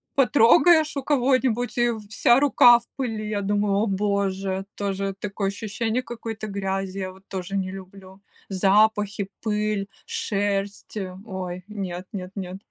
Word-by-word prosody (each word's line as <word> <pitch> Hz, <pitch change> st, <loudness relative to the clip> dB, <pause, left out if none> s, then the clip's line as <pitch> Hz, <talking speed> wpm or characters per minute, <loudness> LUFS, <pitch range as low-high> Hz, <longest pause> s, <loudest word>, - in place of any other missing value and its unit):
потрогаешь 295 Hz, +4 st, +5 dB
у 270 Hz, -, -2 dB
кого-нибудь, 255 Hz, -4 st, +1 dB
и 240 Hz, 0 st, +3 dB, 0.2 s
вся 240 Hz, +3 st, +4 dB
рука 245 Hz, -4 st, +7 dB
в 235 Hz, -, -23 dB
пыли. 220 Hz, -5 st, -3 dB
Я 205 Hz, -1 st, -1 dB
думаю: 205 Hz, 0 st, +1 dB
"О 205 Hz, +3 st, +2 dB
боже!" 195 Hz, -1 st, -1 dB
Тоже 195 Hz, -1 st, -2 dB
такое 200 Hz, -1 st, -2 dB
ощущение 220 Hz, +3 st, -2 dB
какой-то 225 Hz, -3 st, -6 dB
грязи, 195 Hz, -1 st, -3 dB
я 185 Hz, -1 st, -3 dB
вот 190 Hz, +1 st, -19 dB
тоже 190 Hz, 0 st, -5 dB
не 185 Hz, -1 st, -1 dB
люблю. 190 Hz, 0 st, -11 dB, 0.3 s
Запахи, 200 Hz, +1 st, +2 dB
пыль, 210 Hz, -2 st, -1 dB, 0.2 s
шерсть- 200 Hz, +1 st, -2 dB
э, 185 Hz, -2 st, -4 dB
ой! 185 Hz, -3 st, -5 dB
Нет, 190 Hz, -3 st, -5 dB
нет, 185 Hz, -2 st, -5 dB
нет, 185 Hz, -1 st, -5 dB
200 Hz, 140 wpm, -24 LUFS, 195-225 Hz, 0.3 s, рука